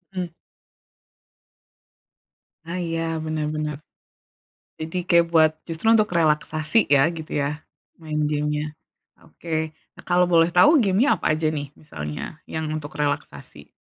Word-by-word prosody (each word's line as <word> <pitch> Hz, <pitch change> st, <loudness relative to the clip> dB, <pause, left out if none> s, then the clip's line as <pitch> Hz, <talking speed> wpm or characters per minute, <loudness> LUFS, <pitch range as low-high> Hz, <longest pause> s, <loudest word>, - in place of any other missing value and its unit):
Mmm. 180 Hz, -1 st, -2 dB, 2.4 s
Ah 175 Hz, +2 st, -4 dB
iya 165 Hz, -1 st, -2 dB, 0.2 s
bener 155 Hz, -1 st, -2 dB
bener. 150 Hz, -1 st, -2 dB, 1.0 s
Jadi 160 Hz, +3 st, -5 dB
kayak 170 Hz, -1 st, +5 dB
buat 160 Hz, -1 st, +6 dB, 0.2 s
justru 165 Hz, +4 st, -5 dB
untuk 215 Hz, -2 st, +4 dB
relaksasi 155 Hz, +4 st, +2 dB
ya, 140 Hz, +3 st, +4 dB
gitu 160 Hz, -2 st, -8 dB
ya, 150 Hz, +2 st, -2 dB, 0.4 s
main 155 Hz, -2 st, -3 dB
game-nya? 150 Hz, 0 st, -1 dB, 0.5 s
Oke. 160 Hz, -1 st, -4 dB, 0.2 s
Nah, -, -, -14 dB
kalau 180 Hz, 0 st, +4 dB
boleh 170 Hz, -1 st, +4 dB
tahu 285 Hz, -, +6 dB
game-nya 210 Hz, +8 st, +3 dB
apa 155 Hz, -, +1 dB
aja 155 Hz, 0 st, 0 dB
nih? 145 Hz, -2 st, -4 dB
Misalnya 75 Hz, -, -7 dB
yang 160 Hz, 0 st, -3 dB
untuk 155 Hz, -1 st, -6 dB
relaksasi. 145 Hz, -, -4 dB
160 Hz, 125 wpm, -23 LUFS, 150-170 Hz, 2.4 s, buat